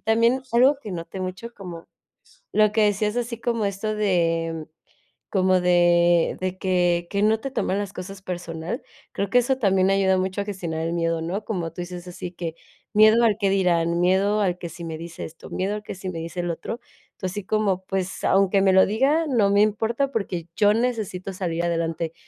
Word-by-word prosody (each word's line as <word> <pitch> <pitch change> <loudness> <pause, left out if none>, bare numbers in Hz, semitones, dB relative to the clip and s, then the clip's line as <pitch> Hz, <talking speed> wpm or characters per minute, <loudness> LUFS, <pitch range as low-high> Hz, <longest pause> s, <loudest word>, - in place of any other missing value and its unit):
también 230 +4 +2
algo 265 +4 +5
que 210 -7 -7
noté 170 +2 -6
mucho, 185 +6 -5
como 175 -4 -9 0.7
lo 215 -1 +5
que 220 0 +3
decías 210 +2 +1
así 235 -1 -3
como 230 -3 0
esto 200 +2 -2
de, 165 -5 0 0.6
como 185 -2 +3
de 175 -1 +4
de 185 0 -2
que 175 -2 +1
que 200 0 -1
no 215 +1 +3
te 275 +1 -5
toman 195 -6 -1
las 205 -1 -4
cosas 195 +1 -8
personal, 170 -2 -5 0.3
creo 200 0 -2
que 245 - +3
eso 255 +2 +3
también 190 -3 +3
ayuda 190 -1 +3
mucho 190 +2 -1
a - - -4
gestionar 170 -6 -4
el 165 - -1
miedo, 165 -1 0
¿no? 190 +6 -3
Como 175 -7 -3
tú 175 - -7
dices 175 0 -7
así 175 0 -7
que: 170 -2 -5 0.4
"Miedo 215 +2 +6
al 215 -3 +3
qué 200 -2 +2
dirán, 170 -3 +2
miedo 195 +4 +2
al 180 -3 +1
que 170 -2 -6
si 170 +2 -9
me 160 -1 -5
dice 165 +1 -8
esto, 160 +1 -10
miedo 195 +3 -1
al 210 - -6
que - - -6
si 190 0 -6
me 170 - -5
dice 170 +2 -4
lo 170 -1 -1
otro". 230 +8 -6 0.3
Entonces, 185 -2 -4
así 205 -2 -4
como, 200 -3 0
pues, 190 -1 -3
aunque 195 0 +3
me 190 -1 +4
lo 190 - +7
diga, 280 +10 +2
no 225 -7 +3
me 200 +1 +4
importa 225 +6 +1
porque, 180 -7 -3
yo 205 0 +4
necesito 215 -6 -2
salir 170 -2 -2
adelante. 165 -1 -1
190 Hz, 200 wpm, -24 LUFS, 175-210 Hz, 0.7 s, lo